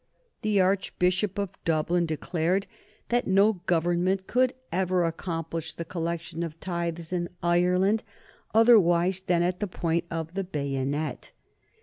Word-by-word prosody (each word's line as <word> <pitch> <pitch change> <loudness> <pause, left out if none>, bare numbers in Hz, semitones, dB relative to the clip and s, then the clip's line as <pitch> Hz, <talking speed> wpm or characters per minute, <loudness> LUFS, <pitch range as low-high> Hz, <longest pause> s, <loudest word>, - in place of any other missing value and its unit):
The 210 -2 +2
Archbishop 185 0 +1
of 200 -2 -2
Dublin 165 +2 +1
declared 170 +4 0 0.4
that 240 0 +1
no 195 0 +3
Government 175 +3 +1
could 255 +3 +2 0.2
ever 185 0 +1
accomplish 165 -1 -4
the 170 - -5
collection 170 -1 -4
of 165 -1 -5
tithes 170 -1 -3
in 175 -1 -1
Ireland 180 +5 +3 0.5
otherwise 190 -6 +5
than 180 -3 +1
at 180 +1 -1
the 210 - -1
point 170 -1 -1
of 165 0 -4
the 195 +1 -2
bayonet. 140 -2 -3
175 Hz, 125 wpm, -27 LUFS, 165-190 Hz, 0.5 s, otherwise